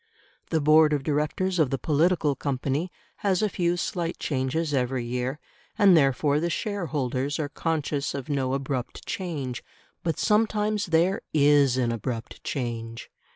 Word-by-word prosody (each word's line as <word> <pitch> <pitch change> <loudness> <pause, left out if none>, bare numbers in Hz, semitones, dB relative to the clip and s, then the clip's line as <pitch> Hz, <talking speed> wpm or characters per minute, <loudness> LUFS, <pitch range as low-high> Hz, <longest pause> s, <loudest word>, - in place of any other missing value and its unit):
The 160 - +1
board 155 +1 +5
of 145 -2 0
directors 155 +5 0
of 150 -5 +3
the 135 - -1
political 155 0 +2
company 140 +5 -2 0.3
has 195 -1 +1
a 210 - +2
few 175 -1 0
slight 175 -1 -2
changes 145 +3 -1
every 125 -2 0
year, 125 +4 -3 0.4
and 200 -4 +6
therefore 140 0 +3
the 170 +2 -1
shareholders 145 - -2
are 150 -2 -2
conscious 150 -3 -2
of 135 -2 -5
no 135 -3 0
abrupt 135 -2 -4
change. 145 -10 -4 0.4
But 165 -3 -1
sometimes 210 -1 +1
there 170 +4 +2
IS 145 -3 +5
an 120 -2 +1
abrupt 115 +1 -5
change. 115 -3 -4
145 Hz, 145 wpm, -26 LUFS, 130-170 Hz, 0.4 s, and